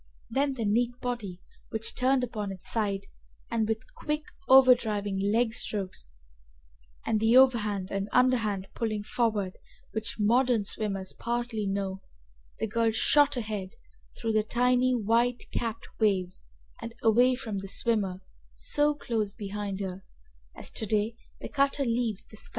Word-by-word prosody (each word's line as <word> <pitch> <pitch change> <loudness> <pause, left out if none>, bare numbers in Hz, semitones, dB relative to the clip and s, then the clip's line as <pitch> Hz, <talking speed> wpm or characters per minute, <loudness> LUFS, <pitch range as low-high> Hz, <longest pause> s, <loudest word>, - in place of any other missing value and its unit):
Then 275 +2 +1
the 230 -4 -2
neat 240 +4 +1
body 215 -8 -4 0.5
turned 255 0 +2
upon 210 -4 -3
its 190 -2 -6
side, 200 -3 -1 0.5
and 225 -2 0
with 220 0 -3
quick 300 0 -3 0.3
outdriving 235 -6 +5
legstrokes 205 - 0 1.0
and 220 - +1
the 225 +3 +5
overhand 210 -7 +3
and 195 +1 -2
underhand 225 -7 +2
pulling 215 -3 -2
forward 210 -4 -1 0.3
which 220 0 -4
modern 235 +1 +3
swimmers 195 -2 -2
partly 235 -3 -2
know, 195 -1 -2 0.6
the - - -1
girl 230 +1 +1
shot 275 +5 +4
ahead 210 -3 -4 0.4
through 225 -1 -1
the 215 0 +3
tiny 250 +3 +2
white 235 +2 +1
capped 230 -1 -3
waves 190 -4 0 0.4
and 230 0 -7
away 245 +3 +5
from 225 -6 -4
the 195 - -7
swimmer 195 -3 +2 0.3
so 295 0 +1
close 220 -7 -2
behind 205 -2 -4
her, 190 0 -5 0.5
as - - -4
to 220 - -2
day 215 +2 0 0.3
the - - -5
cutter 275 0 +1
leaves 230 -4 -1
the 215 - -12
scow. - - -6
220 Hz, 140 wpm, -28 LUFS, 200-245 Hz, 1.0 s, outdriving